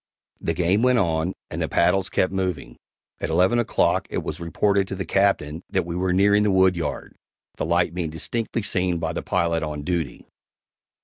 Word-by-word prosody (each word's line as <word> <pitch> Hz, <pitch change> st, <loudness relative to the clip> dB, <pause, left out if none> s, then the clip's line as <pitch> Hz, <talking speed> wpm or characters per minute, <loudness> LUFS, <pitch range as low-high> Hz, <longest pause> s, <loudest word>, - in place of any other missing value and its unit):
The 85 Hz, -, -2 dB
game 90 Hz, +5 st, +2 dB
went 125 Hz, 0 st, +4 dB
on, 85 Hz, -3 st, +1 dB, 0.2 s
and -, -, -4 dB
the -, -, -1 dB
paddles 95 Hz, +3 st, +2 dB
kept 95 Hz, 0 st, 0 dB
moving. 90 Hz, -10 st, -3 dB, 0.4 s
At -, -, -3 dB
eleven 95 Hz, +7 st, +3 dB
o'clock 120 Hz, -, +1 dB
it -, -, -3 dB
was -, -, -5 dB
reported 95 Hz, +4 st, +1 dB
to 95 Hz, -, -4 dB
the 95 Hz, -1 st, -4 dB
Captain 85 Hz, -4 st, +1 dB
that 95 Hz, -3 st, 0 dB
we 85 Hz, 0 st, -5 dB
were 90 Hz, +1 st, 0 dB
nearing 100 Hz, +3 st, +4 dB
the 105 Hz, -, +2 dB
woodyard, 95 Hz, -5 st, +1 dB, 0.4 s
the -, -, -2 dB
light 85 Hz, 0 st, +2 dB
being 85 Hz, -3 st, -2 dB
distinctly 110 Hz, +8 st, -3 dB
seen 90 Hz, -3 st, 0 dB
by 80 Hz, -2 st, -2 dB
the -, -, -3 dB
pilot 85 Hz, -2 st, 0 dB
on 75 Hz, -1 st, -4 dB
duty. 85 Hz, -5 st, -3 dB
90 Hz, 185 wpm, -23 LUFS, 85-95 Hz, 0.4 s, went